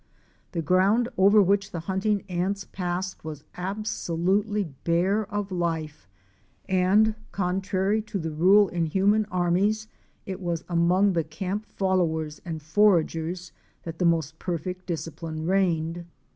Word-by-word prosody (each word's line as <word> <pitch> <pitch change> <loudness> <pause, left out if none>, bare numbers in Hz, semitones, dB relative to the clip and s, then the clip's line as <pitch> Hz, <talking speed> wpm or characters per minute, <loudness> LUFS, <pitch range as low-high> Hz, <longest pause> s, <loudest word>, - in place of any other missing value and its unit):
The 165 -2 -2
ground 195 +9 +3
over 200 +2 +6
which 195 +1 +1
the 170 - -5
hunting 195 +3 0
ants 190 +2 -2
passed 180 0 -4
was 155 -2 -7
absolutely 200 +1 -1 0.2
bare 190 +5 +1
of 205 -1 -3
life, 165 - -3 0.6
and, 190 +4 +3 0.2
contrary 190 +2 0
to 210 -1 -5
the 160 -3 -3
rule 190 +6 +5
in 170 -2 -1
human 200 +6 +2
armies, 195 +3 +1 0.4
it 190 0 -6
was 170 -2 -2
among 180 +3 +3
the 165 -2 +1
camp 190 +7 -4
followers 160 -5 -1
and 160 -3 -6
foragers 170 -1 +1 0.3
that 165 -1 -7
the 180 - +2
most 160 -2 +1
perfect 180 +1 -4
discipline 160 -1 -5
reigned. 170 -2 0
185 Hz, 130 wpm, -26 LUFS, 165-200 Hz, 0.6 s, over